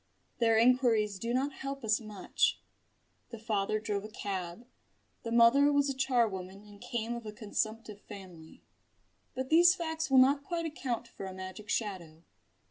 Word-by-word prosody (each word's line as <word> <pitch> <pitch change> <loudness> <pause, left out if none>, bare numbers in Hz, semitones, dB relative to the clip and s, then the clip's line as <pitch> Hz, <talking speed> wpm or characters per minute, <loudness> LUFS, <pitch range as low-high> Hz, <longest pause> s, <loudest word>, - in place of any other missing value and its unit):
Their 225 -2 +4
inquiries 225 -4 +3
do 230 +3 -3
not 270 +3 0
help 275 0 -6
us 215 -1 +2
much. 215 -3 -1 0.7
The 230 - -8
father 215 -1 -1
drove 210 -2 -3
a - - -6
cab; 195 0 -5 0.6
the 230 - -6
mother 240 +5 +5
was 285 -1 +2
a - - -2
charwoman 215 -8 -1
and 205 -1 -16
came 235 -1 -3
of 235 -2 -7
a - - -5
consumptive 215 0 -4
family. 180 -6 -12 0.7
But 260 +1 -4
these 345 +3 +7
facts 320 -3 -3
will 265 - +4
not 275 +2 +5
quite 335 +1 -3
account 250 -7 -4
for 195 - -8
a 190 - -8
magic 190 +3 -8
shadow. 170 -7 -3
230 Hz, 160 wpm, -31 LUFS, 205-260 Hz, 0.7 s, these